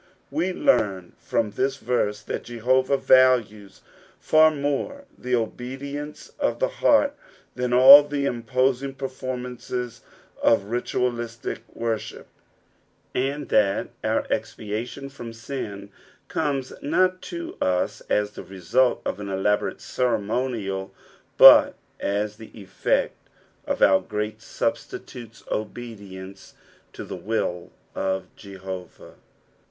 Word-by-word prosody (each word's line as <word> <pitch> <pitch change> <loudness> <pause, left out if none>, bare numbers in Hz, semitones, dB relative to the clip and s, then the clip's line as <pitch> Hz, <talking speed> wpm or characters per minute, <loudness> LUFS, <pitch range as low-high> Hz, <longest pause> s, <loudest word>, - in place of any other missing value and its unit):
We 165 +6 0
tearn 105 - +1
from 110 -2 -1
this 135 +5 -1
verae 105 -5 -1
that - - -4
Jehovah 130 +3 +1
values 120 -7 +3 0.4
far 155 0 +5
more 145 - -3
the 125 0 -1
obedience 135 +6 -5
of - - 0
the - - +1
heart 285 0 +4 0.4
than 125 0 -2
all 130 +4 +10
the 145 -1 -3
imposing 130 +2 0
performances 125 -2 -5 0.4
of 115 -4 +4
ritualistic 120 +1 -3 0.2
worship; 115 -2 -3 0.9
and 140 +2 -2
that 100 -2 +2
our - - 0
expiation 115 +6 -4
from 120 -4 -9
dn 110 -4 -6 0.4
comes 140 -5 -2
not 185 +5 +1
to 170 -1 -7
us 90 -1 0
as 105 0 +1
the - - -9
result 100 +7 +1
of - - -3
an 100 -1 -6
elaborate 100 +2 0
ceremonial, 110 -4 -2 0.5
but - - +9 0.2
as 105 +1 -2
the 110 -1 -11
effect 100 - -2 0.4
of - - 0
our 95 -1 +6
great 105 +1 -4
Substitute's 115 -2 -5
obedience 100 -4 -7 0.4
to - - -8
the - - -7
will 95 -5 -2 0.2
of 95 -1 -3
Jehovah. 95 -2 -9
120 Hz, 110 wpm, -24 LUFS, 105-135 Hz, 0.9 s, all